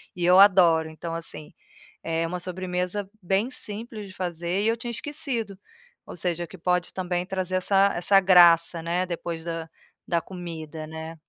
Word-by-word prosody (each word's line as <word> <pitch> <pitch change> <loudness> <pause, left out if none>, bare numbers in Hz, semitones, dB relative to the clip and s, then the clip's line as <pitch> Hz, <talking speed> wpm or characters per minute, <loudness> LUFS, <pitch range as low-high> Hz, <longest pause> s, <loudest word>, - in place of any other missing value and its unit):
e 175 -1 -2
eu 180 +2 +6
adoro. 175 -5 +6
Então 165 +1 -7
assim, 165 -2 -7 0.5
é 165 0 -1
uma 180 +2 -4
sobremesa 180 +2 -3
bem 195 +6 0
simples 215 -2 -7
de 190 - -12
fazer 175 +1 -2
e 210 - +1
eu 230 +1 +1
tinha 240 +1 -5
esquecido. 245 -6 -3 0.5
Ou - - -9
seja, 175 -1 -2
que 175 - -12
pode 180 +1 0
também 180 -1 -2
trazer 185 -1 -3
essa 195 +2 +3
essa 195 +3 +4
graça, 175 -3 +6
né, 175 +3 -1
depois 170 -2 -5
da 165 -1 -5 0.4
da 170 -1 +1
comida, 160 -4 -7
né, 160 +1 -8
180 Hz, 165 wpm, -25 LUFS, 165-195 Hz, 0.5 s, eu